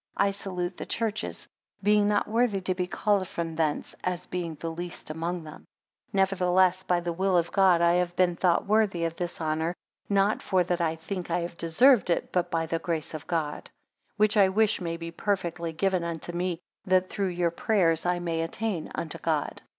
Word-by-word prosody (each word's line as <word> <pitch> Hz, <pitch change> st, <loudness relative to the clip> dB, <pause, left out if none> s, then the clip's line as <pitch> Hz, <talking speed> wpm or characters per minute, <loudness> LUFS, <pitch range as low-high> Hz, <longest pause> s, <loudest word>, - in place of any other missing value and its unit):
I 200 Hz, 0 st, +3 dB
salute 185 Hz, -2 st, -4 dB
the -, -, -5 dB
churches; 220 Hz, -2 st, -3 dB, 0.4 s
being 210 Hz, 0 st, +4 dB
not 205 Hz, 0 st, +1 dB
worthy 225 Hz, -2 st, +1 dB
to 185 Hz, 0 st, 0 dB
be 180 Hz, -1 st, -2 dB
called 200 Hz, 0 st, +1 dB
from 165 Hz, -2 st, -4 dB
thence, 155 Hz, -2 st, -1 dB
as 180 Hz, -1 st, -2 dB
being 170 Hz, -3 st, -4 dB
the 165 Hz, +2 st, -5 dB
least 175 Hz, -1 st, -6 dB
among 165 Hz, +2 st, -3 dB
them. 155 Hz, -1 st, -12 dB, 0.4 s
15 -, -, -41 dB
Nevertheless 185 Hz, -1 st, +3 dB
by 180 Hz, -2 st, +1 dB
the 170 Hz, 0 st, -2 dB
will 190 Hz, +1 st, +2 dB
of 170 Hz, -1 st, 0 dB
God 185 Hz, -4 st, +4 dB
I 170 Hz, 0 st, +5 dB
have 175 Hz, 0 st, 0 dB
been 180 Hz, -1 st, +3 dB
thought 175 Hz, -1 st, +2 dB
worthy 205 Hz, -4 st, +2 dB
of 165 Hz, 0 st, -3 dB
this 175 Hz, 0 st, -4 dB
honour; 160 Hz, +2 st, -1 dB, 0.3 s
not 200 Hz, +1 st, +2 dB
for 185 Hz, -2 st, +2 dB
that 175 Hz, 0 st, -1 dB
I 165 Hz, -1 st, +1 dB
think 180 Hz, +3 st, -5 dB
I -, -, +1 dB
have 170 Hz, 0 st, -5 dB
deserved 180 Hz, +6 st, +4 dB
it, 170 Hz, -, 0 dB
but 175 Hz, -1 st, 0 dB
by 165 Hz, -1 st, 0 dB
the 165 Hz, +1 st, -2 dB
grace 165 Hz, -2 st, -3 dB
of 155 Hz, -, -7 dB
God; 160 Hz, -4 st, -2 dB, 0.5 s
16 -, -, -49 dB
Which 215 Hz, +1 st, +3 dB
I 195 Hz, -2 st, +6 dB
wish 210 Hz, +1 st, +2 dB
may 165 Hz, -1 st, -3 dB
be 165 Hz, 0 st, -6 dB
perfectly 170 Hz, -3 st, -2 dB
given 185 Hz, +1 st, 0 dB
unto 170 Hz, 0 st, -4 dB
me, 175 Hz, 0 st, -2 dB, 0.3 s
that 185 Hz, -1 st, +2 dB
through 200 Hz, -2 st, -1 dB
your 175 Hz, -1 st, 0 dB
prayers 170 Hz, -4 st, +2 dB
I 180 Hz, 0 st, +1 dB
may 170 Hz, -2 st, -2 dB
attain 175 Hz, +1 st, -3 dB
unto 160 Hz, -, -5 dB
God. 155 Hz, -3 st, -1 dB
175 Hz, 205 wpm, -27 LUFS, 165-195 Hz, 0.5 s, I